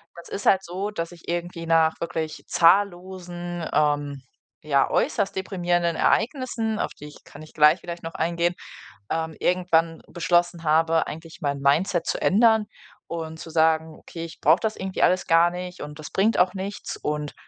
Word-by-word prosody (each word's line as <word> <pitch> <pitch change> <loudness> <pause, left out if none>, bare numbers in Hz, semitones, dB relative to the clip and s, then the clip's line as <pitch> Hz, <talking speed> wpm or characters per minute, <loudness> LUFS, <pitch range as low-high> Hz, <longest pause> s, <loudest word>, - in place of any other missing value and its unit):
das 170 - -12
ist 200 - -5
halt 190 0 +4
so, 190 +4 -4
dass 165 -3 -4
ich 170 -1 -15
irgendwie 170 0 -4
nach 160 -1 +4
wirklich 160 -2 -4
zahllosen, 175 -2 +1
ähm, 145 -2 +1 0.4
ja, 140 -2 +2
äußerst 200 -3 0
deprimierenden 175 -3 0
Ereignissen, 230 - 0
auf - - -2
die 150 - -9
ich 150 - -16
kann 145 - -13
ich 155 - -15
gleich 155 +3 +5
vielleicht 170 0 -7
noch 165 - -7
eingehen, 170 +1 0 0.5
ähm, 160 -1 -2
irgendwann 170 -2 +1
beschlossen 175 0 0
habe, 160 +1 +2
eigentlich 160 +3 -9
mein 140 -2 -1
Mindset 160 +5 +2
zu - - -2
ändern 220 +1 +4 0.4
und 160 -1 -6
zu 165 - -9
sagen: 160 -1 +2
„Okay, 165 -1 -8
ich 165 - -11
brauche - - +4
das 220 -1 -2
irgendwie 190 0 -4
alles 185 +1 +3
gar 165 +1 +5
nicht 180 +1 -7
und 150 +1 -8
das 155 - -9
bringt 215 +4 +2
auch 180 0 +3
nichts." 195 +2 -5
Und, 150 -1 -3
170 Hz, 170 wpm, -24 LUFS, 160-185 Hz, 0.5 s, gleich